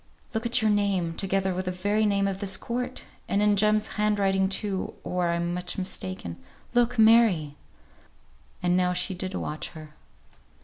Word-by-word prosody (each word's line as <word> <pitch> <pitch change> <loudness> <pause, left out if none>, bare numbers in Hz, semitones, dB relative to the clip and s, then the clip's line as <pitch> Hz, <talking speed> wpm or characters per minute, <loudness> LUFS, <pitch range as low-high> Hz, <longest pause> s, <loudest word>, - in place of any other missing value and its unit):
Look 225 +1 -1
at 240 0 +3
your 215 - +4
name, 195 -5 +1
together 190 0 0
with 185 +1 -3
the 180 - -1
very 205 +4 +1
name 200 -1 +2
of 195 -1 -3
this 195 -1 0
court! 250 +2 -4 0.3
And 200 - +1
in 210 0 +4
Jem's 215 +1 +3 0.2
hand 210 0 +2
writing 195 -1 +2
too, 195 -1 -2
or 180 -1 -1
I'm 170 0 -1
much 180 0 -3
mistaken. 185 - -5 0.3
Look, 245 0 +2
Mary!" 220 -10 +5 1.1
And 175 0 +2
now 180 0 +2
she 180 +2 -1
did 185 +1 -5
watch 150 - -4
her. 155 -1 -11
195 Hz, 170 wpm, -26 LUFS, 180-210 Hz, 1.1 s, Mary